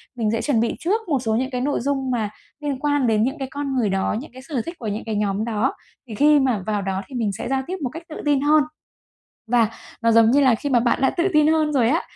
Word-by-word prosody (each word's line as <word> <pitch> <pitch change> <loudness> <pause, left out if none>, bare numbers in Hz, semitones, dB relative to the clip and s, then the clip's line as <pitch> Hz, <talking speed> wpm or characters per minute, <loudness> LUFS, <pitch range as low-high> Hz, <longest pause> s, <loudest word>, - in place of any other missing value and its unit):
mình 220 -3 0
sẽ 225 0 -1
chuẩn 235 -1 +1
bị 230 +1 0
trước 410 +7 0
một 280 -4 +2
số 225 -3 -1
những 260 +3 0
cái 250 -1 -2
nội 285 +3 0
dung 270 0 -1
mà 225 -4 -1 0.3
liên 290 -3 -3
quan 290 -2 +1
đến 215 -1 +3
những 270 +6 -1
cái 270 - -3
con 280 -1 -3
người 235 -5 +1
đó, 195 +1 0
những 280 - -10
cái 260 - -11
sở 270 -2 -3
thích 335 - -6
của 230 - -5
những 210 +1 -3
cái 220 -1 -3
nhóm 205 0 0
đó, 230 +3 0 0.3
thì 220 - -7
khi 295 +4 +5
mà 250 -8 +1
vào 210 -1 0
đó, 195 -1 -2
thì 265 - -10
mình 225 -4 0
sẽ 195 - -5
giao 270 0 +1
tiếp 370 - -3
một 255 - -1
cách 330 +6 -9
tự 310 - -7
tin 290 -2 +2
hơn. 300 +1 +4 0.9
Và, 235 -3 +4 0.3
nó 230 0 +3
giống 225 0 +5
như 285 +3 +4
là 260 -4 +5
khi 285 +6 -4
mà 250 -3 +4
bạn 235 +2 +1
đã 265 - +4
tự 345 +2 0
tin 305 0 +5
hơn 310 -1 +2
rồi 240 -5 +3
á, 320 +6 +2
255 Hz, 285 wpm, -22 LUFS, 225-290 Hz, 0.9 s, khi